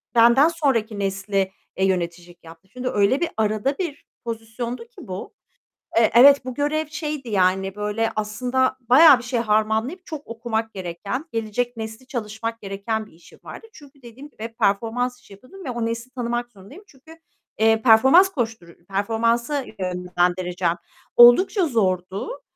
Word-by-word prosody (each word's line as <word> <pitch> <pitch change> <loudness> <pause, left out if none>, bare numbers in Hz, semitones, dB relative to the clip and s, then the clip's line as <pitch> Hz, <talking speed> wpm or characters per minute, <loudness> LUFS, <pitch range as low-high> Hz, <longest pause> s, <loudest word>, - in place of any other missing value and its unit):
Benden 235 +5 +6
sonraki 255 -11 -1
nesle, 195 0 -1 0.3
eee, 190 - +2
yöneticilik 175 -1 -3
yaptım. 165 +3 -15
Şimdi 255 0 -3
öyle 210 +4 +2
bir 345 - 0
arada 215 +6 0
bir 335 -6 -5 0.2
pozisyondu 230 +1 -5
ki 240 - -14
bu, 185 +1 -7 0.6
eee, 230 -1 +4
evet, 275 +2 +7
bu 255 - -5
görev 295 +3 -1
şeydi 300 -4 -5
yani 190 -1 +1
böyle 210 +2 -1
aslında 250 +5 -1
bayağı 265 +4 +7
bir - - -10
şey 245 -1 -2
harmanlayıp 220 - 0
çok 310 -3 -8
okumak 225 -1 -3
gereken, 195 - -5
gelecek 230 +2 -3
nesli 220 +3 -7
çalışmak 230 -2 -5
gereken 205 +2 -4
bir - - -20
işim 170 - -19
vardı. 450 - -10
Çünkü 285 -2 -17
dediğim 250 +5 -12
gibi 225 -4 -8
performans 235 +5 0
işi 205 - -16
yapıyordum 340 - -14
ve - - -4
o 235 -1 -3
nesli 230 +2 -4
tanımak 240 -1 -3
zorundayım. 210 - -14
Çünkü, 315 +4 -17 0.4
eee, 225 0 +3
performans 265 - +6
koştur 225 - -5
Performansa 230 +7 0 0.2
yönlendireceğim. 180 -1 -1 0.4
Oldukça 340 - +6
zordu, 195 - -2
230 Hz, 145 wpm, -22 LUFS, 200-260 Hz, 0.6 s, evet